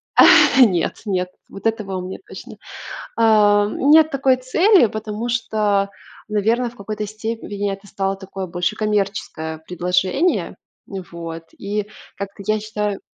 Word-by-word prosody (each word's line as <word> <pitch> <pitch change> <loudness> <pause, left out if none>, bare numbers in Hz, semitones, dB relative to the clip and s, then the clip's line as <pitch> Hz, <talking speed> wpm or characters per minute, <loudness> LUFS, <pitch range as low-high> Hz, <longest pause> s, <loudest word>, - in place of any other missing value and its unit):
А, - - +8 0.4
нет, 180 -6 -1
нет 185 -3 -1 0.2
вот 195 - -4
этого 215 -4 -2
у - - -3
меня 185 +1 -7
точно. - - -10 0.6
Ам, 210 -2 +4
нет 315 0 +7
такой 270 -2 +2
цели, 335 - +4
потому 215 +2 -5
что, 210 -4 0 0.4
наверно, 225 +3 +1
в 245 - -20
какой-то 210 0 -5
степени 215 -2 -4
это 195 +1 -9
стало 195 0 -2
такое 190 -1 -7
больше 180 +4 -2
коммерческое 195 -7 -2
предложение. 180 - 0 0.3
Вот. 170 -4 -7
И 205 +1 -3 0.3
как-то 200 0 -7
я 215 0 +1
считаю 210 -2 -3
205 Hz, 130 wpm, -20 LUFS, 195-220 Hz, 0.6 s, А